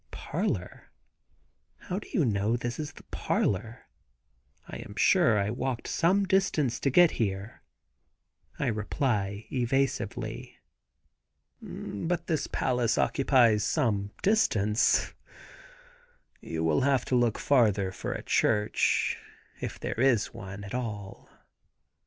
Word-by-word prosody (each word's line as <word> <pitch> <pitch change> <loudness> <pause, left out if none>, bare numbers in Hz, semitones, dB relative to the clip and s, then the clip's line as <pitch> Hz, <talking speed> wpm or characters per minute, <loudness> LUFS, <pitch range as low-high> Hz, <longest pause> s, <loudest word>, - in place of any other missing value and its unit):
"Parlor? - - -4 0.9
How 185 -1 -3
do - - -13
you 165 - +2
know 105 +1 +1
this 120 +2 -4
is 150 -1 -5
the - - -14
parlor? 110 +5 -1 0.8
I - - -7
am - - -10
sure 110 -2 +4
I 100 +1 0
walked 125 0 -3
some 185 +4 +2
distance 185 -10 +1
to 140 - +1
get 175 +4 +6
here," 100 +1 -3 1.0
I - - -1
reply 105 -2 -1
evasively. 135 -2 -2 1.0
"But 170 - -4
this 155 -5 -1
palace 125 -3 0
occupies 120 -6 +3
some 105 -10 0
distance; 110 - +2 1.3
you 80 0 -4
will 80 -2 +2
have 135 -2 +2
to 130 - 0
look 120 -3 +2
farther 105 -8 +2
for - - -5
a - - -6
church, 105 -1 +1 0.4
if - - -5
there - - -4
is 125 -5 +2
one 100 +1 -8
at 100 - -8
all. 105 -5 -5
120 Hz, 115 wpm, -28 LUFS, 105-135 Hz, 1.3 s, get